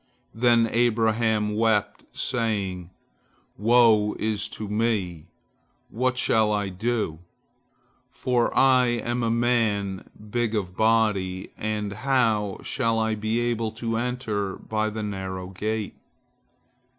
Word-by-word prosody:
Then 120 0 +4
Abraham 110 -2 +1
wept, 105 -2 +1
saying, 100 -8 -2 0.7
"Woe 110 -1 +4
is 105 -2 -3
me, 105 -6 -1 0.6
what 130 +3 0
shall 110 -3 +2
I 105 -2 0
do? 105 -4 -2 0.9
for 125 -2 0
I 130 -2 +5
am 120 0 -1
a 115 - 0
man 115 -5 0 0.2
big 120 -1 0
of 90 -4 -3
body, 105 -4 +1
and 105 -1 -3
how 110 -4 +1
shall 115 -4 0
I 110 0 +1
be 110 +2 -1
able 115 -2 -1
to 115 0 -3
enter 115 -5 -2
by 110 0 -2
the 110 0 -5
narrow 95 -2 -5
gate?" 105 +2 -3
110 Hz, 110 wpm, -25 LUFS, 105-115 Hz, 0.9 s, I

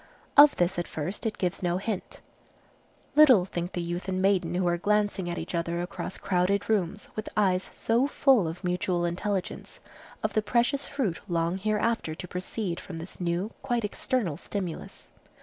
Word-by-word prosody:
Of 290 0 +9
this 175 +1 +1
at 175 - -3
first 180 +9 -3
it 220 - -4
gives 180 -2 -1
no 175 -1 +1
hint. 200 0 -4 0.9
Little 260 -11 +7
think 175 -1 -4
the 175 - -2
youth 175 +2 -4
and 185 -1 -1
maiden 185 -3 +2
who 180 0 +1
are 175 - +3
glancing 205 0 +1
at 175 - -3
each - - -5
other 170 0 -1
across 180 +1 -5
crowded 190 +1 +1
rooms 205 -2 0
with 215 - -4
eyes 190 -3 +2
so 235 +4 +1
full 265 - +4
of 165 +4 -6
mutual 180 -1 0
intelligence, 185 +2 -3 0.4
of - - 0
the 215 - +3
precious 240 +6 +1
fruit 240 - -1
long 170 0 0
hereafter 215 -4 0
to 180 - -7
proceed 180 0 -3
from 175 - -8
this 165 +3 -8
new, 175 +5 -1
quite 240 -3 0
external 205 - -1
stimulus. 185 -2 -6
185 Hz, 170 wpm, -28 LUFS, 175-210 Hz, 0.9 s, Of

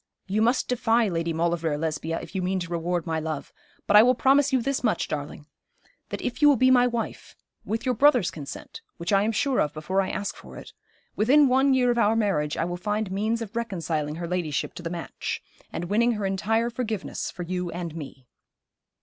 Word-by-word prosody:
You 205 +2 0
must 240 +3 +2
defy 235 -2 +2
Lady 165 -1 -1
Maulevrier, 165 -2 0
Lesbia, 160 +1 -2
if 165 - -10
you 190 - -1
mean 185 +1 0
to 170 0 -6
reward 175 0 -1
my 160 -2 -1
love. 155 -2 -5 0.3
But 205 - +3
I 210 - +11
will 250 +3 +4
promise 275 +3 +4
you 260 - +3
this 270 +3 -1
much, 225 - +1
darling, 145 0 -5 0.6
that - - -5
if 250 - -3
you 295 - +8
will 285 - +6
be 255 +1 +4
my 250 -1 +5
wife 235 -2 -4 0.3
with 225 +3 -3
your 255 - +2
brother's 245 - +4
consent 145 -4 -9 0.2
which 170 +4 -2
I 195 - +5
am 215 +2 +1
sure 265 +4 +1
of 150 - -1
before 185 +6 0
I 190 - -2
ask 200 - -3
for - - -12
it, - - -11 0.4
within 275 +7 +5
one 265 +1 +4
year 250 -1 +3
of 240 - 0
our 215 0 +3
marriage 190 -10 0
I 165 - 0
will 175 0 -3
find 210 +2 -2
means 220 +4 -1
of 215 0 -11
reconciling 165 -9 -2
her 170 +1 -5
ladyship 170 -5 -2
to - - -8
the 170 - -4
match, 170 -1 -4 0.3
and 175 - -4
winning 230 +6 +2
her 210 -2 -3
entire 225 +5 0
forgiveness 225 -5 -3
for 180 - -6
you 180 0 -3
and 170 -2 -5
me.' 140 -4 -9
195 Hz, 215 wpm, -26 LUFS, 170-235 Hz, 0.6 s, I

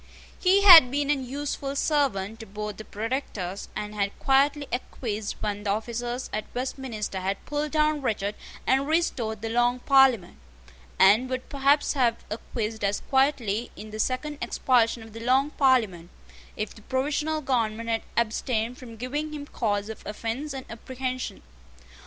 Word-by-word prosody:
He 390 +2 +4
had 330 -10 +11
been 285 +2 0
an 275 -3 0
useful 280 0 -3
servant 225 -9 0
to 225 - -9
both 210 0 -5
the 215 - -7
Protectors, 210 -5 -4
and 210 0 -4
had 200 -1 -2
quietly 280 +1 +2
acquiesced 220 -4 -3
when 205 -1 -2
the 205 - -3
officers 240 +4 -2
at 215 - -2
Westminster 245 -6 -3
had 195 +1 -3
pulled 295 +1 -2
down 305 -1 +2
Richard 210 -5 -1 0.3
and 270 +2 +2
restored 240 -10 0
the 225 - -2
Long 240 +2 +2
Parliament, 265 -10 +4 0.6
and 210 +7 +5
would 255 -1 -3
perhaps 280 +1 +2
have 240 -5 +1
acquiesced 220 0 -4
as 200 0 0
quietly 250 -5 +2
in 215 0 -9
the 215 - -7
second 275 +6 -1
expulsion 235 -2 +2
of 220 -1 -13
the 225 - -8
Long 260 +5 +2
Parliament, 220 - +2 0.5
if 210 -1 -3
the 215 - -15
provisional 295 +6 -1
government 230 -4 -1
had 225 -1 +1 0.2
abstained 235 +1 0
from 235 -3 -10
giving 295 +6 -3
him 290 -1 -6
cause 205 -7 -1
of 220 - -8
offence 230 +8 -4
and 265 -1 -6
apprehension. 255 - -5
245 Hz, 155 wpm, -26 LUFS, 215-275 Hz, 0.6 s, had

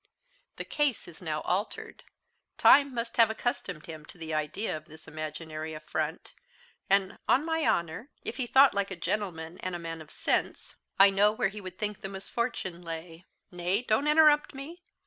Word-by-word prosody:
The - - -5
case 295 -6 0
is 170 - -12
now 155 -3 -2
altered. 230 - -3 0.5
Time 280 -1 +7
must 235 -1 -4
have 230 -2 +7
accustomed 220 - -3
him 160 -2 -8
to - - -10
the 160 -1 -5
idea 155 +8 -1
of 155 0 -8
this 155 +1 -15
imaginary 155 0 -6
affront; 155 +1 -4 0.6
and, 195 0 +2
on 280 +5 +4
my 320 -1 0
honour, 170 - 0
if - - -5
he 255 -3 -1
thought 270 +3 +6
like 200 -1 0
a 190 - -5
gentleman 175 -3 -3
and 185 -1 -3
a - - -2
man 165 -1 -6
of 155 - -13
sense, - - -1 0.2
I 195 0 +8
know 205 +2 +4
where 215 -2 0
he 210 +1 -8
would 185 -1 -9
think 210 -1 -3
the 195 - -5
misfortune 195 -2 -3
lay. 165 0 -8 0.2
Nay, 180 +5 0
don't 245 +5 +1
interrupt 300 -2 +5
me. 315 +6 -8
190 Hz, 180 wpm, -29 LUFS, 160-235 Hz, 0.6 s, I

